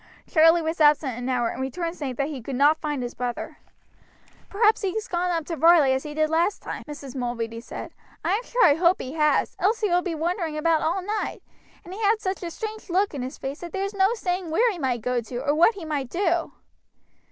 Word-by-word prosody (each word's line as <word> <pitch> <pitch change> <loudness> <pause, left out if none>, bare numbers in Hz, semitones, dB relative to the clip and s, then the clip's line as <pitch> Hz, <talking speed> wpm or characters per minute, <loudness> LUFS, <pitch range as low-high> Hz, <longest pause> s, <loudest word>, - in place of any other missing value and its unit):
Charlie 325 +1 +5
was 320 0 -2
absent 295 -4 +4
an 245 +1 -4
hour, 245 -2 +1
and - - -5
returned 330 +6 -3
saying 270 -6 -4
that 275 +3 -1
he 280 -5 -6
could 265 +3 -5
not 290 +4 +4
find 295 -4 -2
his 245 - -5
brother. 245 -1 -5 0.9
"Perhaps 425 +2 +3
he's 415 +2 -2
gone 355 0 -1
up 330 -3 -1
to 335 - -4
Varley 320 -4 +5
as 265 - 0
he 295 +1 -8
did 310 0 +2
last 335 +6 0
time," - - -5
Mrs. 285 -3 -8
Mulready 235 -2 -3
said. - - -8 0.3
"I - - +2
am 420 - +1
sure - - +2
I 290 - +7
hope 345 +4 +3
he 260 - -6
has, 300 -1 +2
else 430 +5 +1
he 420 - +1
will 355 +1 +3
be 355 -3 -3
wandering 330 -1 -2
about 320 0 +2
all 350 +4 0
night, 420 +2 -3 0.4
and 360 - -9
he 420 - -7
had 430 +1 +3
such 380 -2 -3
a 345 - -4
strange 435 +3 -7
lock 385 +2 +1
in 280 - -4
his 255 +1 -6
face 275 +2 -5
that 345 -1 -8
there's 395 +1 -2
no 395 +3 +2
saying 360 -4 -2
where 455 +10 +3
he 365 - -7
might 255 -5 -1
go 250 +1 0
to, 240 +2 -7
or 290 - +2
what 340 +9 +4
he 370 -5 -7
might 285 -5 -3
do." 345 -1 0
325 Hz, 235 wpm, -25 LUFS, 275-370 Hz, 0.9 s, I